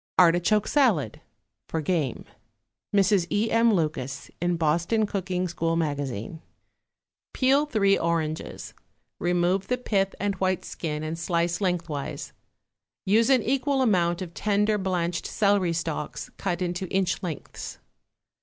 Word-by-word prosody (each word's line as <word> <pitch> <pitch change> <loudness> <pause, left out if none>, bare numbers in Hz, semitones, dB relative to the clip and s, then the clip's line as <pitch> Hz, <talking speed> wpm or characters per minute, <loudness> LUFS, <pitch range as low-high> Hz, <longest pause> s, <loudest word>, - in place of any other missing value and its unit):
=Artichoke 180 +4 +4
Salad.= 210 - +2 0.5
(For 160 - -1
game.) 155 -5 -1 0.7
(MRS. 195 -3 +3
E. 215 +2 0
M. 230 0 +4
LUCAS, 150 -7 -2
IN 175 0 +1
BOSTON 170 +8 +1
COOKING 185 -2 -2
SCHOOL 165 -1 -1
MAGAZINE.) 145 -3 -3 0.9
Peel 275 +3 +3
three 200 -7 +3
oranges, 160 -2 -2 0.5
remove 180 +2 +1
the 250 - 0
pith 195 -6 0
and 205 0 0
white 185 -1 0
skin 155 -2 -4
and 160 +2 -4
slice 170 +2 0
lengthwise; 170 -6 -2 0.7
use 220 +5 +4
an 260 -4 +4
equal 270 +1 +1
amount 175 -5 +2
of 170 -2 -9
tender 210 +1 +1
blanched 175 -3 -1
celery 200 -4 +2
stalks 165 -2 -4
cut 180 -2 -2
into 175 +1 -3
inch 190 -1 0
lengths. 170 -6 -6
180 Hz, 125 wpm, -26 LUFS, 165-205 Hz, 0.9 s, =Artichoke